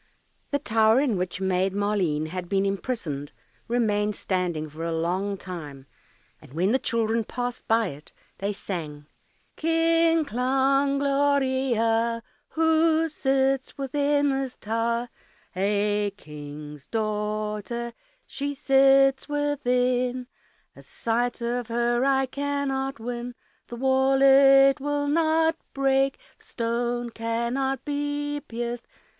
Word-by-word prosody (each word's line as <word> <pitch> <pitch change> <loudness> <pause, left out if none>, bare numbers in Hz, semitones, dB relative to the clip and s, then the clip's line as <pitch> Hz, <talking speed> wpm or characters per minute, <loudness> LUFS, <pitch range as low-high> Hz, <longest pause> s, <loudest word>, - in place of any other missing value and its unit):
The 285 - +1
tower 220 -3 +3
in 270 -6 +1
which 180 0 -3
Maid 190 0 0
Maleen 190 -7 0
had 180 0 -5
been 195 0 +1
imprisoned 195 - -3 0.3
remained 210 -3 +1
standing 175 -5 -2
for 155 +2 -8
a 165 - -2
long 185 +5 -1
time, 150 -8 -8 0.6
and - - -16
when 180 +6 +1
the 260 - +3
children 230 -1 0
passed 245 +2 -5
by 225 -2 +2
it 145 0 -12 0.3
they 200 +1 -1
sang, 155 -7 -6 0.5
"Kling, 330 0 +2
klang, 270 +2 +1
gloria. 260 -5 +1 0.3
Who 320 0 +3
sits 270 -2 0
within 285 +1 +1
this 270 -1 -2
tower? 230 +2 -1 0.5
A 205 +1 +1
King's 150 -2 -10
daughter, 215 +2 -3 0.3
she 285 0 -4
sits 270 0 +4
within, 250 -4 0 0.5
A - - -13
sight 240 +2 -2
of 240 0 -2
her 240 +1 +1
I 270 0 +3
cannot 270 -1 -2
win, 240 +1 -5 0.3
The 240 - -7
wall 265 +2 +2
it 275 0 +7
will 290 +1 -1
not 320 +1 +2 0.2
break, 270 0 +2 0.2
The - - -22
stone 240 +1 -2
cannot 235 +4 -2
be 290 0 -2
pierced. 240 0 -5
240 Hz, 115 wpm, -25 LUFS, 210-275 Hz, 0.6 s, it